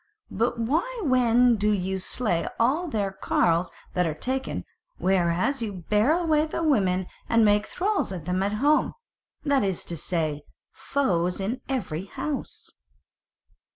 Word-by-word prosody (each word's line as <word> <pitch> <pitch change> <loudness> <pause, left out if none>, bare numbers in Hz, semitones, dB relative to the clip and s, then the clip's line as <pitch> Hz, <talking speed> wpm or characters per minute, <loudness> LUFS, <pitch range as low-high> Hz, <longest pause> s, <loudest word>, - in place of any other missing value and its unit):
But 235 +4 0
why 325 - -1
then 245 -2 +4
do 210 +1 +1
ye 190 -1 -1
slay 185 -2 0
all 285 +10 +2
their 205 -9 -1
carles 175 -2 +1 0.2
that 180 -2 +1
are 155 - -2
taken; 260 +10 -3 0.3
whereas 185 +8 +1
ye 225 - -2
bear 210 - +1
away 315 -3 +2
the 330 - -3
women 190 - +2 0.2
and 230 -1 +4
make 205 0 +3
thralls 395 - -1
of 175 -5 -6
them 180 +2 0
at 200 +2 0
home, 290 +8 +2 0.5
that 280 -5 +3
is 190 -3 -1
to 170 - -4
say, 155 -2 -2 0.3
foes 180 -11 0
in 225 +7 -3
every 195 - -2
house?" 285 +7 -5
210 Hz, 145 wpm, -26 LUFS, 185-270 Hz, 0.5 s, then